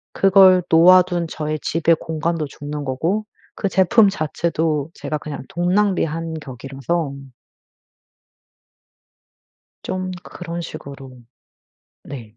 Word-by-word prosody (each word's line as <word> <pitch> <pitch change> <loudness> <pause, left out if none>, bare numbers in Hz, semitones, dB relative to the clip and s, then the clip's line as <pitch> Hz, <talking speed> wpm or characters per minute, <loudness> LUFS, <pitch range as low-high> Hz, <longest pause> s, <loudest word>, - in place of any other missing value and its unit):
그걸 190 -2 +6
놓아 180 +3 +7
둔 175 -2 -2
저의 155 -1 -4
집에 165 +1 +2
공간도 160 0 -2
죽는 145 +1 -7
거고 165 +11 -1 0.3
그 200 - -2
제품 195 +4 +4
자체도 160 -3 -2
제가 155 - -4
그냥 145 -2 -7
돈 175 +1 -1
낭비한 165 -5 0
격이라서 135 +3 -4 2.7
좀 185 0 -3
그런 170 -1 -7
식으로 135 -5 -10 0.8
네. 115 -6 -10
165 Hz, 200 characters per minute, -20 LUFS, 145-180 Hz, 2.7 s, 놓아